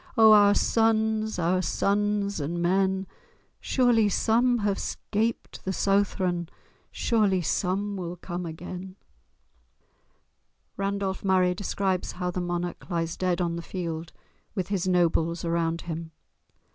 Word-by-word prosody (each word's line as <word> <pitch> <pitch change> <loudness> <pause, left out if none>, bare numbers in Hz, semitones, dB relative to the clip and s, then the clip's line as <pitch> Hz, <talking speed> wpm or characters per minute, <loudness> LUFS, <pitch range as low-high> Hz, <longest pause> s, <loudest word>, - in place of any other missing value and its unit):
O 220 -1 +8
our 205 -1 +7
sons, 220 -1 +1
our 180 +1 +1
sons 200 +2 0
and 160 +4 -3
men! 190 +2 +1 0.5
Surely 240 -5 +3
some 240 +5 +2
have 200 -1 0
'scaped 225 +2 -3
the 190 - -2
Southron, 185 -3 0 0.4
Surely 205 -6 +1
some 200 +5 -1
will 175 -1 -5
come 175 0 -5
again!" 180 +3 -7 1.8
Randolph 195 -1 -2
Murray 185 -2 +3
describes 190 -1 -2
how 180 0 -3
the 180 - -3
monarch 175 +1 -4
lies 165 -2 -1
dead 180 -1 0
on 170 -1 -1
the - - -4
field 165 -2 -5 0.4
with 185 -3 -2
his 190 -3 -1
nobles 170 -2 +1
round 165 0 0
him. 165 -1 -5
185 Hz, 120 wpm, -27 LUFS, 175-205 Hz, 1.8 s, O